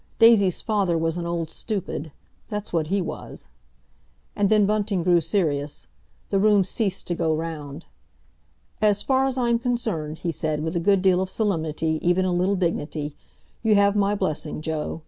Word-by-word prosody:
Daisy's 220 -6 +5
father 200 -6 +1
was 165 +1 -1
an 170 - -3
old 170 -2 -3
stupid—that's 205 +1 -6
what 160 -2 +1
he 195 +4 +1
was. 170 - -7 0.9
And 200 -1 +2
then 215 -2 +4
Bunting 205 -3 0
grew 175 -1 +4
serious. 150 - -1 0.5
The 195 - +3
room 205 -1 +4
ceased 195 +1 -2
to 175 - -2
go 160 -2 0
round. 155 -1 -6 1.0
"As 205 -1 +3
far 265 0 +2
as 265 -1 -3
I'm 235 -2 +2
concerned," 220 - -2
he 170 - -2
said, 155 -1 -2
with 160 +2 -3
a - - +2
good 195 +2 +2
deal 185 -1 +4
of 190 - -2
solemnity, 160 -6 -1
even 180 +2 +2
a 185 - 0
little 185 +3 +1
dignity, 155 -4 -2 0.5
"you 220 -2 +3
have 200 0 +4
my 205 0 +2
blessing, 155 -6 -3
Joe. 160 0 -3
185 Hz, 165 wpm, -24 LUFS, 160-205 Hz, 1.0 s, Daisy's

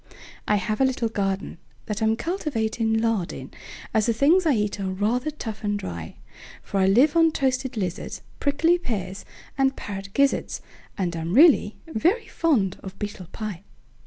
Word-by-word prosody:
I 210 - +4
have 210 +4 -1
a - - +6
little 255 -3 +1
gardenThat 200 +1 -4
I'm 220 0 +3
cultivating 230 - -1
lard 220 -5 +1
in, - - -8 0.4
As 220 -1 +2
the 230 - +3
things 325 +9 +4
I 300 - +5
eat 210 -3 -1
are 195 -1 -2
rather 220 +9 0
tough 220 -8 -6
and 205 0 0
dry; 85 - -6 0.5
For 195 - -2
I 190 - +4
live 255 - +5
on 330 -1 +5
toasted 260 -3 -1
lizards, 180 -4 -4 0.2
Prickly 325 +5 +3
pears, 200 - -4 0.3
and 270 0 +3
parrot 195 -1 -6
gizzards, 280 0 +2 0.4
And 175 -4 -1
I'm 165 +3 -2
really 280 -8 +6
very 350 - +1
fond 255 - +1
of 190 0 -9
beetle 205 -4 -6
pie. 210 -6 -5
220 Hz, 160 wpm, -25 LUFS, 195-275 Hz, 0.5 s, a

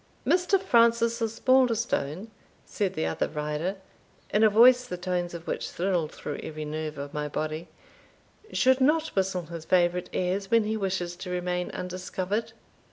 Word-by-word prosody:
"Mr. 365 +2 +3
Francis 235 -7 +3
Osbaldistone," 230 - +1 0.3
said 200 -3 -2
the 80 - -1
other 80 - -1
rider, 150 +5 -3 0.6
in 210 - +3
a 220 - +7
voice 245 +4 +6
the 180 -7 -6
tones 175 -1 -2
of 170 0 -8
which - - -3
thrilled 175 -3 -1
through 145 - -6
every 155 -1 -6
nerve 155 0 -4
of 140 0 -6
my 150 0 -2
body, 155 +3 -4 0.8
"should 260 0 +3
not 310 +4 +3
whistle 190 - -1
his 165 0 -8
favourite 180 +1 +2
airs 190 +2 -1
when 230 0 +4
he 215 +1 -1
wishes 190 -4 -2
to 185 - -7
remain 180 0 -2
undiscovered." 185 +3 -4
185 Hz, 155 wpm, -27 LUFS, 170-230 Hz, 0.8 s, a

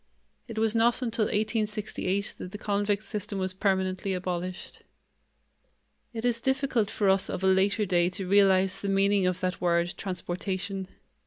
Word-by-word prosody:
It 225 -2 -8
was 220 0 +2
not 235 +3 +3
until 230 -2 0
1868 210 -2 -1
that 180 - -7
the 210 - -6
convict 205 0 0
system 205 -1 -4
was 185 -1 -2
permanently 190 -1 0
abolished. 180 0 -5 1.3
It 230 -1 -4
is 235 -1 +1
difficult 265 -5 +1
for 205 - 0
us 190 0 +3
of 190 - -4
a - - +4
later 195 +3 +3
day 175 -2 +2
to 190 - -4
realize 195 -1 +4
the 200 - -2
meaning 195 -1 +3
of 185 0 -1
that 185 -1 -2
word, 170 0 +1
transportation. 190 +1 -4
195 Hz, 155 wpm, -28 LUFS, 185-215 Hz, 1.3 s, a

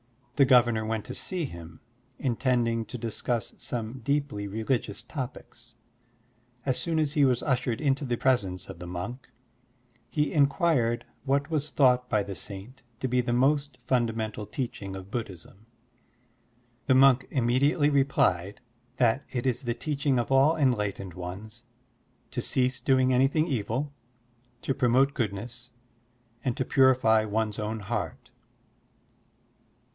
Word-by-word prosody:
The 140 - +5
governor 120 -4 +4
went 110 -1 -2
to - - -6
see 180 -4 -2
him, 85 - -10 0.4
intending 120 -3 0
to 125 - -7
discuss 115 0 -2
some 120 +1 -4
deeply 140 -5 -1
religious 110 +1 -2
topics. 120 -4 -8 0.9
As 130 -2 0
soon 165 -2 -1
as 150 -2 +1
he 150 - +3
was 125 -3 +2
ushered 125 -4 0
into 140 -1 +1
the 120 -2 -1
presence 100 -9 0
of 95 -3 -9
the 90 - -7
monk, 90 +9 -6 0.8
he 150 +2 0
inquired 140 -6 +2 0.2
what 140 +3 0
was 150 -1 -1
thought 125 -2 +3
by 105 -1 +2
the 100 0 -6
saint 100 +8 -8 0.2
to 130 - -1
be 125 0 +2
the 120 - -2
most 140 +4 +2
fundamental 110 -4 -1
teaching 105 -8 -5
of 95 +1 -9
Buddhism. 105 -1 -7 1.2
The 130 - +5
monk 135 -1 +5
immediately 140 +4 +2
replied 105 -9 +1 0.4
that 125 +2 +2
it 125 -1 -3
is 125 -3 0
the 120 -3 -2
teaching 140 0 0
of 120 +2 -1
all 140 +5 +5
enlightened 105 - 0
ones 100 +7 -8 0.7
to 130 -1 -2
cease 130 +1 0
doing 130 -1 +3
anything 135 +5 +3
evil, 130 +1 -2 0.7
to 135 - 0
promote 130 +2 +3
goodness, 120 +2 -4 0.7
and 125 -3 -1
to 130 - 0
purify 125 -5 +4
one's 110 0 -1
own 110 +1 -3
heart. 100 -4 -4
125 Hz, 135 wpm, -28 LUFS, 110-135 Hz, 1.2 s, The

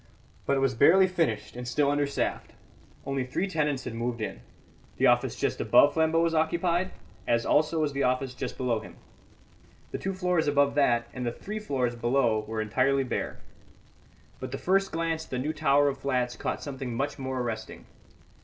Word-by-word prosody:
But 140 - +2
it - - 0
was 135 -1 +2
barely 185 +11 +6
finished 155 - -1
and 125 0 -6
still 140 +3 +2
understaffed; 145 -1 -1 0.5
only 135 -1 -1
three 130 +10 -2
tenants 150 -7 -1
had - - -5
moved 115 +1 -3
in; 105 - -5 0.6
the - - +2
office - - +3
just - - -1
above 145 - +5
Flambeau 160 0 +2
was 165 -1 +1
occupied, 170 +3 +1 0.4
as 115 0 +2
also 155 +2 +2
was 150 -2 0
the 140 - -2
office 130 0 0
just 125 - -5
below 120 -3 0
him; 110 - -12 1.0
the - - -4
two 190 0 -3
floors 180 -4 +1
above 140 -1 +3
that 120 -5 +2
and 125 - -5
the 120 - -1
three 210 - -6
floors 130 - -1
below 120 -1 +1
were 110 0 -2
entirely 130 +5 +1
bare. 125 - -3 1.0
But - - -6
the - - -3
first 195 +1 +1
glance 165 -1 -2
at - - -22
the 130 - -3
new 145 +5 -2
tower 145 -2 +3
of 140 - -2
flats 125 -2 -1
caught - - -3
something 135 -4 -5
much 140 +4 -2
more 130 -1 -3
arresting. 120 -3 -5
140 Hz, 185 wpm, -28 LUFS, 125-160 Hz, 1.0 s, barely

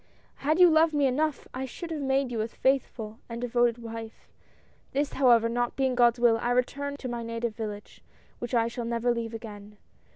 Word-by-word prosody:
" - - -34
Had 310 +5 0
you 360 - +9
loved 315 -1 +4
me 290 -1 +3
enough 290 +2 0
I 260 +1 -3
should 330 +6 -8
have 310 -2 -3
made 270 -1 +1
you 225 -2 -1
a 220 - -1
faithful 230 -4 -1
and 230 0 -5
devoted 240 -1 +1
wife. 225 -1 -9 0.7
This, 285 +1 0
however, 240 -4 +5
not 240 +1 -1
being 265 -1 +1
God's 240 -1 +4
will, 235 -1 +4
I 240 - -1
return 280 +3 -1
to 265 - -6
my 240 -1 -4
native 230 -1 -3
village, 210 -2 -7 0.4
which 240 +1 -3
I 230 -1 +3
shall 235 0 -5
never 235 +1 0
leave 230 -1 -4
again. 210 -2 -10
240 Hz, 200 wpm, -28 LUFS, 230-270 Hz, 0.7 s, you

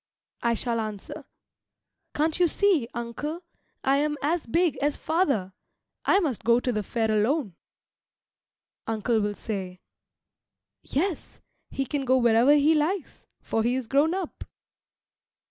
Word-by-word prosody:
I 235 0 +2
shall 230 0 -1
answer, 215 -3 -6 0.9
"Can't 315 +3 +1
you 355 - +5
see, 345 - +2
uncle, 290 +9 -5 0.4
I 270 +1 +3
am 295 +1 0
as 320 +1 0
big 335 +6 +1
as 290 +1 0
father. 275 - 0 0.5
I 390 - +5
must 280 - -2
go 235 +1 +4
to 250 - -1
the 215 -2 -1
fair 220 +2 -1
alone." 215 - +1 1.3
Uncle 225 +1 0
will 205 0 -1
say, 190 -5 -5 1.0
"Yes, 340 +4 -3 0.3
he 270 - -2
can 285 +1 -2
go 260 0 +3
wherever 240 +3 +5
he 295 +2 +4
likes, 315 +3 -2 0.2
for 225 - 0
he 240 +3 +1
is 260 -1 -2
grown 290 +7 +2
up." 380 -4 -5
265 Hz, 135 wpm, -26 LUFS, 225-310 Hz, 1.3 s, you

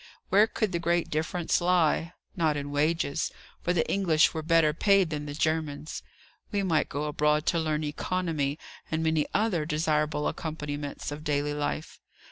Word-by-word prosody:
Where 205 +3 +5
could 215 -3 -1
the 170 - -1
great 170 0 0
difference 165 +3 0
lie? 175 -1 +2 0.2
Not 160 -5 +1
in 145 0 -4
wages; 155 +1 0 0.3
for 175 - 0
the 175 -2 +1
English 170 -5 +3
were 160 - -2
better 160 -1 +3
paid 195 0 +3
than 150 -1 -3
the 145 - -5
Germans. 155 -1 -2 0.5
We 200 -2 0
might 165 -5 +1
go 145 - -3
abroad 150 +1 +1
to 170 - +2
learn 155 -1 -1
economy, 150 -2 -1 0.3
and 160 0 -1
many 160 -2 +1
other 200 -7 +2
desirable 150 -1 0
accompaniments 145 -3 -4
of 150 +1 -6
daily 145 -1 0
life. 145 +1 -3
155 Hz, 160 wpm, -28 LUFS, 150-170 Hz, 0.5 s, Where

